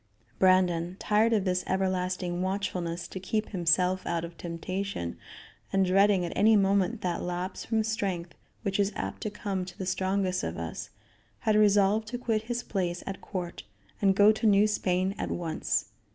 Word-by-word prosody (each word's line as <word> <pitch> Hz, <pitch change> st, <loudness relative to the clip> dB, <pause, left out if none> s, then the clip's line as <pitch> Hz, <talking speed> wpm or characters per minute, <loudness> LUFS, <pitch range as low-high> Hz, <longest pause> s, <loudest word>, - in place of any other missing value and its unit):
Brandon, 180 Hz, -2 st, +3 dB
tired 215 Hz, +3 st, +2 dB
of 210 Hz, -4 st, +2 dB
this 180 Hz, -1 st, +1 dB
everlasting 185 Hz, -1 st, -1 dB
watchfulness 185 Hz, -3 st, -2 dB
to 190 Hz, -, -7 dB
keep 215 Hz, +3 st, -2 dB
himself 180 Hz, 0 st, +2 dB
out 170 Hz, -1 st, -1 dB
of 170 Hz, 0 st, -10 dB
temptation, 170 Hz, -, -4 dB, 0.6 s
and, 195 Hz, -1 st, +3 dB
dreading 195 Hz, 0 st, +4 dB
at 170 Hz, -, -4 dB
any 220 Hz, +2 st, +5 dB
moment 200 Hz, +2 st, +2 dB
that 175 Hz, -2 st, -1 dB
lapse 180 Hz, +2 st, -4 dB
from 220 Hz, -1 st, +1 dB
strength 195 Hz, -6 st, -2 dB, 0.3 s
which 195 Hz, -1 st, -1 dB
is 200 Hz, 0 st, +2 dB
apt -, -, -4 dB
to 215 Hz, -, -2 dB
come 200 Hz, -2 st, -3 dB
to 180 Hz, -, -10 dB
the 190 Hz, -, -4 dB
strongest 185 Hz, 0 st, 0 dB
of -, -, -3 dB
us, -, -, -5 dB, 0.5 s
had 215 Hz, -3 st, +2 dB
resolved 210 Hz, +1 st, +4 dB
to 245 Hz, +2 st, -4 dB
quit 225 Hz, -3 st, 0 dB
his 240 Hz, 0 st, -1 dB
place 175 Hz, -3 st, -2 dB
at 195 Hz, -, -6 dB
court 180 Hz, -3 st, -5 dB, 0.4 s
and 195 Hz, -2 st, +4 dB
go 205 Hz, +2 st, +7 dB
to 220 Hz, +1 st, 0 dB
New 205 Hz, 0 st, +5 dB
Spain 190 Hz, -2 st, 0 dB
at -, -, -2 dB
once. 160 Hz, -10 st, -1 dB
190 Hz, 170 wpm, -28 LUFS, 180-205 Hz, 0.6 s, go